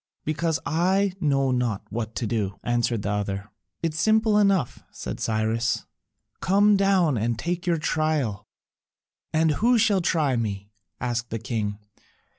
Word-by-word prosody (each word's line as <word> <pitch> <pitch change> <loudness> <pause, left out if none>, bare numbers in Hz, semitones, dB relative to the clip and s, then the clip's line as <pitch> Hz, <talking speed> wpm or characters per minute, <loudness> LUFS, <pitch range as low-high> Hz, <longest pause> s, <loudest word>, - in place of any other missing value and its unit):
"Because 160 +1 0
I 185 +4 +2
know 135 -5 +2
not 120 -5 -1
what 110 0 -4
to 120 - -2
do," 100 -3 -1
answered 120 -2 0
the 105 - -1
other. 100 0 -3 0.3
"It 165 -2 0
is 160 - -4
simple 220 +1 +3
enough," 195 - +2
said - - -6
Cyrus, 110 +1 0 0.5
"come 205 +2 +4
down 190 - +3
and 115 +1 0
take 175 +7 -3
your 170 -1 +3
trial." 150 -10 -1 0.8
"And 160 0 +3
who 240 +2 +5
shall 210 -4 +3
try 155 -6 +1
me?" 100 -3 -3 0.3
asked 120 -1 -2
the 115 - -3
king. 105 -2 -3
135 Hz, 145 wpm, -25 LUFS, 110-175 Hz, 0.8 s, who